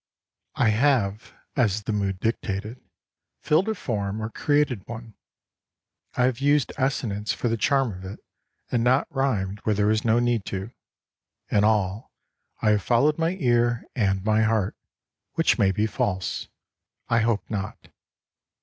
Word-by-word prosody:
I 120 - +3
have, 110 -3 +1 0.2
as 105 -5 +1
the 110 - -2
mood 100 -2 -1
dictated, 110 +1 -3 0.6
filled 170 +8 +2
a 220 - 0
form 105 - -3
or 110 +1 -4
created 145 -9 0
one. 115 -1 -8 1.0
I 125 - +2
have 125 -1 +1
used 145 -1 +2
assonance 110 -6 -1
for 120 - -1
the 115 - +1
charm 135 +3 +2
of 95 0 -9
it, 95 - -7 0.5
and 120 -2 +1
not 130 +3 +3
rhymed 105 -8 -1
where 105 0 0
there 105 0 +2
was 110 +1 +2
no 115 0 +3
need 120 -3 +1
to. 95 +3 -5 0.8
In 100 - +3
all, 105 0 +1 0.5
I 110 - +4
have 105 -1 +2
followed 145 +8 +2
my 165 +3 0
ear 120 -3 +2
and 95 -5 0
my 110 0 +3
heart, 110 -3 +1 0.6
which - - +2
may 95 -1 +4
be 105 +3 0
false. 95 -3 -2 0.6
I 115 - +3
hope 115 -2 0
not. 105 -1 -5
110 Hz, 150 wpm, -25 LUFS, 100-125 Hz, 1.0 s, I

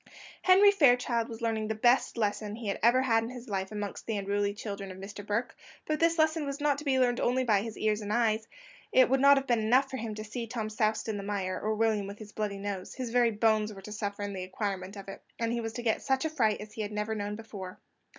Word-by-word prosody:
Henry 390 +2 +7
Fairchild 245 - +3
was 230 0 -8
learning 220 -1 0
the 220 - -2
best 240 +3 +3
lesson 210 -1 -1
he 225 -2 -5
had 195 - -2
ever 240 +3 +5
had 225 -3 +3
in 225 - -5
his 250 -1 -9
life 190 -2 -3
amongst 210 -1 -5
the 220 -2 -1
unruly 200 +1 0
children 200 -2 -6
of 185 - -9
Mr. 205 +2 -8
Burke; 210 +4 -2 0.3
but 305 -1 -1
this 330 0 +3
lesson 315 0 +2
was 280 0 -4
not 290 -1 +1
to - - -8
be 270 -3 +2
learned 245 -2 +2
only 255 +1 +2
by 210 -5 +3
his 220 0 -6
ears 215 0 0
and 205 0 -4
eyes; 225 -1 +1 0.4
it 255 -1 +5
would 270 - +4
not 280 +1 +7
have 270 - 0
been 240 -3 +2
enough 255 +5 +3
for 260 - -3
him 220 -2 -4
to 215 - -5
have 215 - -13
seen 235 -2 -4
Tom 220 -2 -3
soused 215 0 0
in 215 -2 -2
the - - -4
mire, 195 -2 -2
or 215 +1 0
William 215 -2 +1
with 200 +1 -8
his 215 -1 -11
bloody 210 -2 -3
nose; 195 -2 -5
his 255 -3 -4
very 240 -1 +4
bones 215 -1 +2
were 195 -2 -10
to 210 - -9
suffer 205 -1 -4
in 205 0 -4
the 190 - -5
acquirement 190 0 -4
of 195 -1 -9
it, 195 - -8 0.2
and 230 0 -1
he 235 - -1
was 225 -1 -4
to 240 - -5
get 225 -2 +1
such 265 +2 0
a 315 - -1
fright 225 -9 +1
as 210 0 -9
he 220 - -5
had 205 0 -3
never 210 +1 -2
known 205 -1 -3
before. 205 -4 -8
220 Hz, 270 wpm, -30 LUFS, 205-245 Hz, 0.4 s, Henry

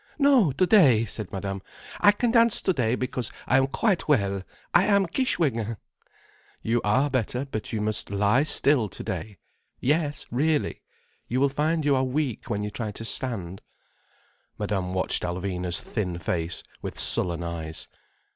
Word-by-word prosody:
"No, 275 - +5
today," 140 - +5
said 105 -2 -6
Madame. 95 0 -4 0.4
"I 205 - +7
can 230 +3 0
dance 230 -2 +4
today, 125 -10 +1
because 125 -2 -3
I 130 - +3
am 135 0 +3
quite 190 - 0
well. 100 -9 +2 0.3
I 175 +3 +5
am 200 -2 +3
Kishwégin." 140 - 0 0.9
"You 115 +1 +1
are 130 +8 +3
better. 130 0 -1
But 110 -6 -5
you 110 - -2
must 110 +1 -2
lie 100 +5 +3
still 140 -6 +3
today. 105 +2 -6 0.4
Yes, 150 +2 0
really—you 140 -2 -2
will 140 +1 +3
find 155 +3 0
you 145 -2 +4
are 130 - +2
weak 130 -2 -2
when 105 0 -1
you 105 - -4
try 110 -1 -4
to 115 +2 -8
stand." 100 -8 -3 1.0
Madame 95 -3 -2
watched 95 - +1
Alvina's 90 0 -1
thin 90 -6 -3
face 85 0 -3 0.2
with - - -6
sullen 85 -1 +1
eyes. 80 -2 -4
120 Hz, 145 wpm, -26 LUFS, 100-150 Hz, 1.0 s, I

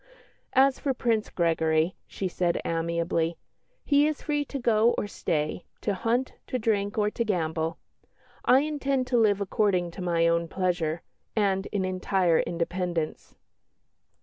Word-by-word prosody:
"As 270 0 +4
for 275 -3 -1
Prince 225 -3 0
Gregory," 165 0 +1
she 195 - -3
said 175 -1 0
amiably, 165 0 0 0.5
"he 290 0 +4
is 305 -2 -3
free 295 -1 0
to 280 - -5
go 230 -2 +3
or - - 0
stay, 155 -5 -2 0.2
to 205 - 0
hunt, 235 +6 0
to 255 - -1
drink, 210 -3 0
or 210 -1 +2
to 235 - -1
gamble. 160 -6 -1 0.7
I 260 +2 +5
intend 275 -3 -1
to - - +5
live 205 -3 +3
according 190 -3 +1
to 185 - -8
my 170 -2 +2
own 170 0 +1
pleasure, 175 -3 -1 0.3
and 195 -3 +1
in 195 -2 -1
entire 185 -2 +1
independence." 170 -1 -2
190 Hz, 145 wpm, -27 LUFS, 170-230 Hz, 0.7 s, I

